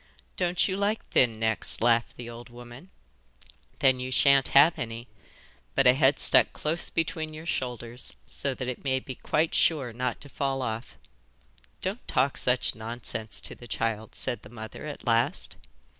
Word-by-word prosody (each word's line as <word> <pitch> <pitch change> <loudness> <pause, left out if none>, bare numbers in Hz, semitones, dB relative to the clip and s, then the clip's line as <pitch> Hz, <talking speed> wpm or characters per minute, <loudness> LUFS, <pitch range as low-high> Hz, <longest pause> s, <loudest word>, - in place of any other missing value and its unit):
'Don't 175 0 +1
you 190 - -1
like 205 +2 -1
thin 115 -4 +2
necks?' 110 -1 +1
laughed 115 0 +2
the 120 - -7
old 120 +1 -9
woman. 120 +7 -12 0.9
'Then 130 -1 +4
you 130 0 -4
sha'n't 135 +3 +5
have 150 +4 +5
any, 115 +1 -5 0.7
but 135 - +3
a 125 - +8
head 135 +1 +3
stuck - - +4
close 160 +2 +1
between 155 -1 -2
your 160 +1 -9
shoulders 125 -5 -4
so 140 -2 -3
that 130 - -5
it 125 - -5
may 130 -2 +1
be 130 - -7
quite 155 +5 0
sure 135 -8 +2
not 125 0 -2
to 145 - -6
fall 135 -1 -2
off.' 110 0 -5 0.9
'Don't 195 +6 -3
talk 135 0 +2
such 125 0 +1
nonsense 110 0 -4
to - - +1
the 120 - -13
child,' 110 -2 -3
said 120 - -2
the - - -13
mother 110 +5 -8
at 145 - -8
last. 115 -1 +1
125 Hz, 170 wpm, -27 LUFS, 115-145 Hz, 0.9 s, a